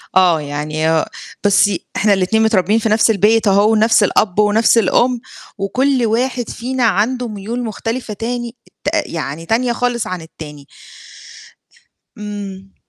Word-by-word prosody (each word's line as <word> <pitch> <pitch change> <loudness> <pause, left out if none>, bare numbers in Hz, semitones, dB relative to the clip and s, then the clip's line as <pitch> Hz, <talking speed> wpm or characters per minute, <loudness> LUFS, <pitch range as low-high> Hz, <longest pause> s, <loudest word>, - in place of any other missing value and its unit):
آه 175 -4 +4
يعني 150 +2 -2
هو 160 -1 +2 0.4
بُصي، 205 -2 +3
إحنا 210 -1 +3
الاتنين 200 +4 +1
متربيين 215 0 +2
في 220 - -1
نفس 220 +1 +3
البيت 215 +2 +2
أهو، 200 +2 +4
ونفس 220 0 +4
الأب 205 0 +1
ونفس 215 +3 +3
الأُم، 240 +3 +2 0.4
وكُلّ 250 +6 0
واحد 245 +1 -1
فينا 255 +2 -3
عنده 230 +4 +1
ميول 220 +3 -5
مختلفة 225 +1 -4
تاني 240 +2 -4 0.3
ت - - -6 0.2
يعني 165 0 -5
تانية 240 +3 0
خالص 245 -1 -1
عن 185 -2 -5
التاني. 150 -3 -11 1.5
امم. 200 -2 -8
215 Hz, 135 wpm, -17 LUFS, 190-235 Hz, 1.5 s, آه